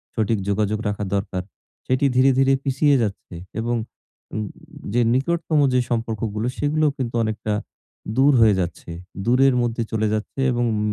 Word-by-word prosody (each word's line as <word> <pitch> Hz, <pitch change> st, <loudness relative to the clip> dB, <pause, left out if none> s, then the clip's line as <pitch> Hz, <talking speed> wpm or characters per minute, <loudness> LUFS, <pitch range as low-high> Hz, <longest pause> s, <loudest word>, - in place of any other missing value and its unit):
সঠিক 110 Hz, -1 st, +1 dB
যোগাযোগ 105 Hz, +1 st, 0 dB
রাখা 105 Hz, 0 st, -2 dB
দরকার, 100 Hz, -2 st, -2 dB, 0.5 s
সেটি 130 Hz, +2 st, +2 dB
ধীরে, 135 Hz, +1 st, +5 dB
ধীরে 135 Hz, 0 st, +4 dB
পিছিয়ে 140 Hz, +2 st, +3 dB
যাচ্ছে। 100 Hz, -4 st, -4 dB, 0.2 s
এবং 120 Hz, +1 st, -1 dB, 1.2 s
যে 120 Hz, -, +3 dB
নিকটতম 155 Hz, +3 st, +1 dB
যে 125 Hz, -, +4 dB
সম্পর্কগুলো, 115 Hz, -1 st, -2 dB
সেগুলোও 150 Hz, +1 st, +1 dB
কিন্তু 120 Hz, -3 st, -3 dB
অনেকটা 110 Hz, -1 st, -2 dB, 0.6 s
দূর 140 Hz, +2 st, +6 dB
হয়ে 110 Hz, -3 st, +6 dB
যাচ্ছে। 85 Hz, -1 st, -4 dB, 0.3 s
দূরের 130 Hz, +2 st, +4 dB
মধ্যে 120 Hz, -1 st, -1 dB
চলে 110 Hz, -1 st, +1 dB
যাচ্ছে 110 Hz, +5 st, -4 dB
এবং 120 Hz, 0 st, 0 dB
উম 105 Hz, -, -1 dB
120 Hz, 145 wpm, -22 LUFS, 110-135 Hz, 1.2 s, দূর